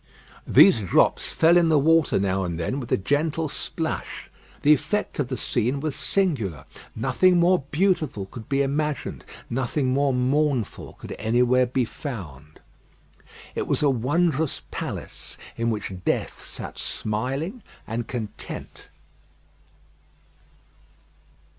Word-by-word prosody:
These - - +7
drops 95 - +2
fell 165 +2 +5
in 170 -2 +4
the 155 - +5
water 160 +2 +4
now 95 0 0
and 85 -2 -3
then 125 +12 -2
with 120 - -7
a - - +4
gentle 150 - 0
splash. 160 +2 -4 0.3
The 150 - +7
effect 155 +8 -1
of 140 - +1
the 130 -1 -3
scene 125 +3 0
was 150 -1 -3
singular. 115 - -1 0.3
Nothing 185 -1 +3
more 175 -3 +3
beautiful 155 - +1
could 110 +3 -11
be 140 0 +2
imagined; 145 0 -2 0.2
nothing 130 +2 -1
more 140 +2 +2
mournful 130 -2 0
could - - -11
anywhere 125 +3 +3
be 125 0 0
found. 80 - -8 0.9
It - - -3
was - - +1
a 145 - +5
wondrous 145 +4 0
palace, - - -6 0.2
in 115 0 0
which 105 -3 -3
death - - -1
sat - - -7
smiling 135 - -3 0.2
and 115 +1 -4
content. 110 -5 -7
135 Hz, 125 wpm, -24 LUFS, 115-155 Hz, 0.9 s, These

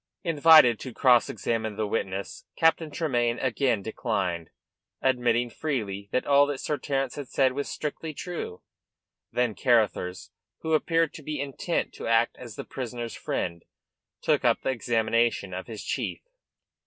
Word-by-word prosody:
Invited 155 - +6
to 130 -3 -8
cross 125 -3 +5
examine 110 -2 -2
the 110 +1 -1
witness, 100 -2 -3
Captain 165 -1 +3
Tremayne 120 -7 0
again 125 -4 0
declined, 95 -7 -2 0.5
admitting 120 -2 +1
freely 105 -11 -3
that 130 - 0
all 140 0 +5
that 145 -1 -2
Sir 150 -2 -2
Terence 135 -1 -2
had 145 -3 -5
said 130 0 +2
was 140 +1 -3
strictly 155 +1 -4
true. 155 - -6 0.7
Then 125 -3 +1
Carruthers, 105 -8 +1 0.3
who 160 - -1
appeared 165 0 +2
to - - -9
be 150 0 -4
intent 140 +5 -2
to - - -6
act 115 +1 +3
as 120 -4 -9
the - - -6
prisoner's 120 -2 -5
friend, 85 -1 -3 0.6
took - - +2
up - - +3
the - - 0
examination 115 -4 +1
of 95 +1 -5
his 110 -3 -7
chief. - - -3
120 Hz, 150 wpm, -27 LUFS, 110-145 Hz, 0.7 s, Invited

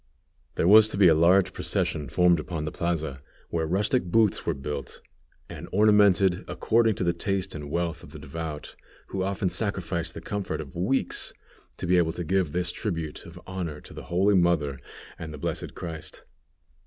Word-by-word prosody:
There - - +1
was 110 +2 +8
to 100 - -4
be 95 -2 +7
a - - +6
large 90 +4 +4
procession 75 -4 -2
formed 90 +1 +4
upon 75 0 -4
the 75 - -3
plaza, 80 -5 -2 0.3
where 80 -1 -1
rustic 105 +8 +1
booths 105 +3 +2
were 85 - +1
built, 70 -1 -6 0.5
and - - -9
ornamented 100 -3 +4
according 115 -1 +2
to - - -2
the 85 -1 +2
taste 95 +2 -2
and 75 -2 -7
wealth 85 +1 -2
of - - -12
the - - -10
devout, 80 -2 -6 0.3
who 95 - -3
often 95 -1 -1
sacrificed 90 -5 -2
the - - -5
comfort 105 -2 -3
of 70 -4 -8
weeks, 100 +11 -1 0.4
to - - -4
be 90 +1 +3
able 80 -2 +2
to 90 - -4
give 90 -1 +1
this 90 +2 -1
tribute 85 -7 -4
of - - -11
honor 90 -5 -5
to - - -13
the - - -9
Holy 95 +4 +2
Mother 85 -7 +2 0.4
and 80 -2 -6
the 75 - -7
Blessed - - -4
Christ. 80 -3 -8
85 Hz, 180 wpm, -26 LUFS, 80-95 Hz, 0.5 s, was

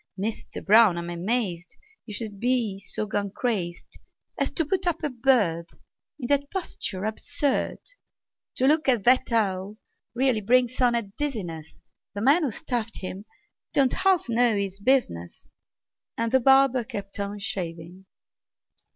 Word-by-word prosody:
Mister 210 +3 -5
Brown, 210 -3 +6
I'm 170 0 -4
amazed 180 -1 -2 0.3
You 210 - -6
should 210 -3 -5
be 235 -5 0
so 205 +2 -4
gone 200 0 -2
crazed 190 -6 -3 0.4
As 275 - +2
to 325 - 0
put 375 +4 -1
up 345 - -1
a 295 - -1
bird 220 -10 +2 0.5
In 250 - -5
that 280 +2 +1
posture 210 - -4
absurd! 275 +6 -1 0.8
To 255 - +1
look 305 +1 +3
at 240 -6 +2
that 250 +2 +4
owl 200 -2 0 0.4
really 250 -3 +2
brings 250 +4 +2
on 245 -1 +4
a 235 - 0
dizziness; 195 - -5 0.3
The 205 - -3
man 285 +8 +5
who 295 - 0
stuffed 230 0 -3
him 190 +2 -6 0.5
don't 270 -2 +3
half 380 -6 +2
know 235 -1 +3
his 195 -1 -3
business!" 200 - 0 0.7
And 230 0 -1
the 260 - +5
barber 265 -1 +5
kept 205 -4 -7
on 200 +1 -3
shaving. 180 -2 -6
225 Hz, 145 wpm, -25 LUFS, 195-260 Hz, 0.8 s, Brown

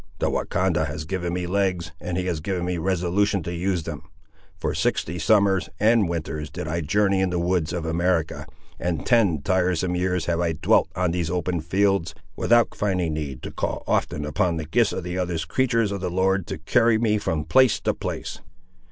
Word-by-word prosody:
The - - 0
Wahcondah - - 0
has 80 - -5
given 90 0 -3
me 90 0 -2
legs, 95 -4 0
and 90 0 -3
he 90 - -1
has 85 -4 -1
given 90 +1 -2
me 90 -1 -2
resolution 95 +2 +1
to 85 - -4
use 90 0 -1
them. 75 -2 -6 0.6
For - - -2
sixty 85 +3 -1
summers 100 +1 +3
and 110 -3 +4
winters 75 -3 -4
did 75 - -6
I 85 +2 -1
journey 95 +4 +2
in 95 - +1
the 90 - -1
woods 85 -2 0
of 85 -2 -3
America, 85 0 0 0.3
and 85 -3 -2
ten 100 - +3
tiresome 90 0 +1
years 90 -2 0
have 85 -1 0
I 85 -1 +1
dwelt 75 - +2
on 90 -2 +1
these 85 -1 -1
open 90 -1 -1
fields, 95 +1 +1 0.2
without 120 -1 +3
finding 90 -5 -1
need 70 -4 -5
to - - -5
call - - -3
often 75 0 0
upon 80 +3 0
the 80 - -4
gifts 80 - +2
of - - -4
the 90 +1 -3
other 90 -2 -1
creatur's 115 -1 +1
of 100 -2 -4
the 90 - -1
Lord 95 0 +1
to - - -4
carry 110 +8 +3
me 110 -2 +1
from 80 -7 -2
place 130 +5 +4
to - - +1
place." - - -5
90 Hz, 195 wpm, -24 LUFS, 80-95 Hz, 0.6 s, and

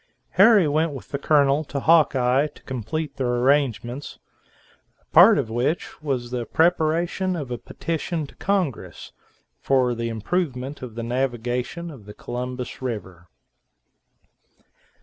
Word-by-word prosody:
Harry 200 -2 +6
went 155 +1 +1
with 135 - -9
the 140 - -3
Colonel 145 0 +3
to 140 - -4
Hawkeye 140 -4 +4
to 145 - -18
complete 140 +4 -4
their 125 -2 0
arrangements, 130 0 0 0.8
a - - -35
part - - +8
of 110 - -2
which 125 +10 -2
was 130 -5 -3
the 120 -2 -3
preparation 170 +2 +1
of 140 -7 -5
a 120 - -3
petition 165 -1 -3
to - - -15
congress 185 - -2 0.5
for 130 -2 +2
the 115 0 -3
improvement 130 - -3
of 120 -4 -8
the 115 - -4
navigation 125 +6 -2
of 110 -8 -13
Columbus 125 +1 -5
River. 95 -8 -6
135 Hz, 130 wpm, -23 LUFS, 120-155 Hz, 0.8 s, part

